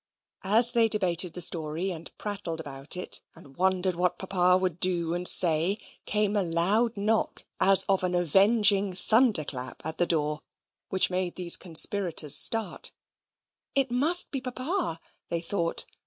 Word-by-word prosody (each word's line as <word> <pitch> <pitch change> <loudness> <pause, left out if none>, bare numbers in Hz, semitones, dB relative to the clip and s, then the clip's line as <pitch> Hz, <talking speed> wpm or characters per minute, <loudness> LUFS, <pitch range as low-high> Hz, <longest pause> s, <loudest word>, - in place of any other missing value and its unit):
As 230 +3 +4
they 230 -2 +2
debated 180 -5 +1
the 180 - 0
story, 165 +3 -1
and 165 -1 -9
prattled 200 -6 -6
about 140 +2 -5
it, 180 - -6
and 135 -1 -17
wondered 185 0 0
what 180 +1 -1
Papa 180 -1 +1
would 185 -3 -3
do 175 -3 +1
and 175 +1 +1
say, 170 +3 +4 0.3
came 210 0 -1
a 205 - +2
loud 195 +7 0
knock, 215 +2 -2
as 195 0 +4
of 195 -1 0
an 180 -1 -1
avenging 200 +3 +2
thunder 215 -1 +2
clap, 130 -2 -7
at 160 0 -2
the 175 - +2
door, 150 -2 -1 0.5
which 190 0 +2
made 180 -1 -3
these 175 -2 +4
conspirators 170 -3 +2
start. 225 0 +2 0.8
It 270 -2 0
must 305 +9 +1
be 270 - -5
Papa, 255 - -4 0.3
they 170 - -2
thought. 170 0 -2
185 Hz, 155 wpm, -26 LUFS, 170-210 Hz, 0.8 s, As